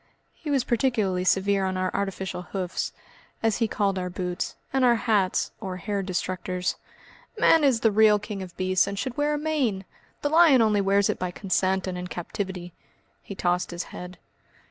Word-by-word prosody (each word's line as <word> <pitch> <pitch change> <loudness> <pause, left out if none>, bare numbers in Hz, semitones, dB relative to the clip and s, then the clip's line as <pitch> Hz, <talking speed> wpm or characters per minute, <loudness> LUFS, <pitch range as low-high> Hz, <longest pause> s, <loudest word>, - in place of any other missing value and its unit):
He 310 - -8
was 275 -3 +2
particularly 220 -8 +1
severe 195 +1 +2
on 190 -1 -1
our 185 0 0
artificial 195 -2 -3
hoofs, 180 0 -3 0.5
as 225 -2 +2
he 230 - +1
called 200 -2 0
our 180 0 -3
boots, 180 0 -3 0.2
and 265 -1 +2
our 240 -1 +5
hats 210 -5 +1
or 190 -3 -4
hair 200 +2 -2
destructors. 185 -1 -2 0.6
"Man 325 -2 +5
is 260 -5 +3
the 225 - +4
real 210 0 +5
King 210 -1 -6
of 185 -2 -9
Beasts 185 0 +2
and 200 - -4
should 250 +3 -3
wear 295 +1 +1
a - - -1
mane. 275 -11 -1 0.4
The 290 - +1
lion 315 -4 +6
only 215 -3 +3
wears 200 0 +3
it - - -2
by 180 - -1
consent 190 0 0
and 180 -1 -4
in 180 - -5
captivity." 180 0 -5 0.5
He 200 - -8
tossed 180 -1 0
his 175 0 -4
head. 180 +1 -8
195 Hz, 185 wpm, -26 LUFS, 185-225 Hz, 0.6 s, lion